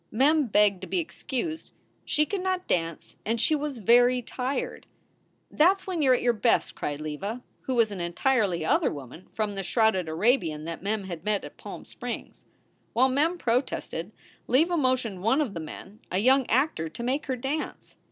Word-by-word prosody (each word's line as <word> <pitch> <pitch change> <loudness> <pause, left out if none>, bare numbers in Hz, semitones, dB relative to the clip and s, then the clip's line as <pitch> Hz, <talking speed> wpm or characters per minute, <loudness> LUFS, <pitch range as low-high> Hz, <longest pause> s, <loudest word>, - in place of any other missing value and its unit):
Mem 280 +5 +3
begged 205 -3 +3
to - - -6
be - - -1
excused. 315 -1 -4 0.3
She 300 0 +2
could 390 +3 -3
not 370 -1 -1
dance 165 -2 -2
and 225 +2 -1
she 310 - +3
was 295 -3 -1
very 245 +3 +4
tired. 275 - -3 0.6
"That 350 +6 +5
s - - -16
when 360 -4 -2
you 275 - +3
re 255 - +6
at - - -5
your 240 -1 +4
best," 230 +1 +2
cried 145 0 -4
Leva, 195 +11 -4 0.2
who 260 - -2
was 230 -3 +3
an 190 -3 -5
entirely 180 -1 +1
other - - +3
woman 140 +5 -9
from 215 -2 -2
the 195 - -3
shrouded 195 -4 +2
Arabian 160 - +1
that 165 0 -5
Mem 205 +2 -1
had 175 -4 -7
met 210 -1 0
at - - -10
Palm - - -9
Springs. - - -7 0.5
While 255 +3 +4
Mem 305 +7 +2
protested 230 - -1 0.4
Leva 320 +8 +3
motioned 255 - 0
one 230 +8 +3
of 275 -9 0
the 170 - -4
men, 190 +6 -9
a 185 - 0
young 260 +5 +4
actor, 240 - +1
to 235 - -7
make 265 +5 -1
her 260 - 0
dance. 270 +5 -4
235 Hz, 190 wpm, -27 LUFS, 190-275 Hz, 0.6 s, re